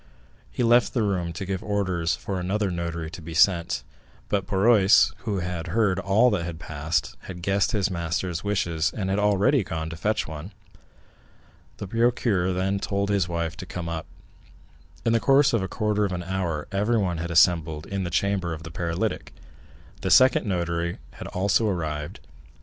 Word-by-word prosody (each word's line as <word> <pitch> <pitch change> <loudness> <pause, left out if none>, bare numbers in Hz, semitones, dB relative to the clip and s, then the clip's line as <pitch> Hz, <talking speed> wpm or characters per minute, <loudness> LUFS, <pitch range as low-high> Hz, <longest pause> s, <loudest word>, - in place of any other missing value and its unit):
He - - -1
left 120 +2 +4
the 115 - +2
room 90 -4 -1
to 90 +4 -5
give 95 0 -3
orders 95 -6 0
for 95 0 -4
another 100 +2 -1
notary 85 -2 -4
to 85 - -9
be 80 0 -8
sent, 85 0 +3 0.5
but 100 -2 0
Barrois, 100 0 +5
who 100 -4 -1
had 90 -1 -4
heard 100 -4 +2
all 100 +6 +3
that 85 -5 -2
passed, 80 +1 -2
had 90 -2 -8
guessed 100 +2 +1
his 100 -2 0
master's 85 0 -2
wishes, 85 -5 0
and 95 -2 -1
had 100 - +1
already 105 +5 +3
gone 80 -2 -4
to - - -6
fetch 105 +6 -1
one. 80 +5 -8 1.2
The - - -5
procureur 115 -4 +1
then 95 +2 0
told 100 +1 -1
his 95 -4 +1
wife 85 -1 -2
to 90 - -8
come 90 -2 -5
up. 80 -1 -4 1.0
In 115 - +3
the 115 - +4
course 135 +2 +4
of 115 - +2
a 95 - -2
quarter 105 0 0
of 100 -2 -1
an 90 -1 -3
hour 85 -4 -3
everyone 100 -4 0
had 85 +1 -3
assembled 80 -2 +3
in 100 -1 -3
the 85 - -3
chamber 95 -1 0
of 80 - -11
the 80 - -8
paralytic; 85 0 -2 0.7
the - - -1
second 130 -3 +5
notary 85 -2 -1
had - - -9
also 100 +4 +1
arrived. 75 -6 -3
95 Hz, 175 wpm, -25 LUFS, 85-100 Hz, 1.2 s, Barrois